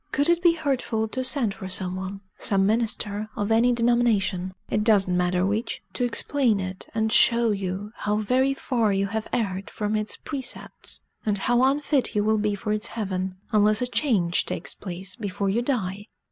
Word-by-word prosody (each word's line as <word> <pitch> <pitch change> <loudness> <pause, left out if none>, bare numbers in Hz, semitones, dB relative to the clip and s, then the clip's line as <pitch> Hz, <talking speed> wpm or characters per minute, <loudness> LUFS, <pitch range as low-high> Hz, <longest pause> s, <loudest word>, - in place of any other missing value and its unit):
Could 285 +4 +2
it 345 0 +3
be 345 -2 +5
hurtful 265 -8 -1
to 260 +3 -3
send 255 -5 +2
for 190 - -8
some 185 -1 -2
one 190 +1 -5 0.2
some 195 -1 +2
minister 215 -1 -1
of 205 +1 -2
any 230 +2 +4
denomination, 230 -6 +1
it 210 - 0
does 210 -4 +5
not 180 - 0
matter 180 0 +1
which 210 +5 -2
to 250 - -1
explain 245 -2 +1
it, 185 0 -5
and 220 0 +1
show 235 -2 +5
you 195 +1 -3
how 210 0 -1
very 255 +6 +1
far 235 -6 0
you 195 0 +1
have 220 +2 -3
erred 195 -4 -2
from 210 0 -2
its 215 0 -1
precepts, 270 -4 -4 0.2
and 210 -2 +1
how 240 +5 +2
unfit 275 -1 +1
you 205 - +2
will 215 0 +2
be 210 -1 0
for 210 +1 -2
its 215 +2 -1
heaven, 190 -4 -3 0.2
unless 210 0 +4
a 250 - 0
change 215 - +1
takes - - -3
place 185 0 -4
before 200 -1 -2
you 230 +4 +1
die?" 205 -6 -2
215 Hz, 190 wpm, -25 LUFS, 195-240 Hz, 0.2 s, be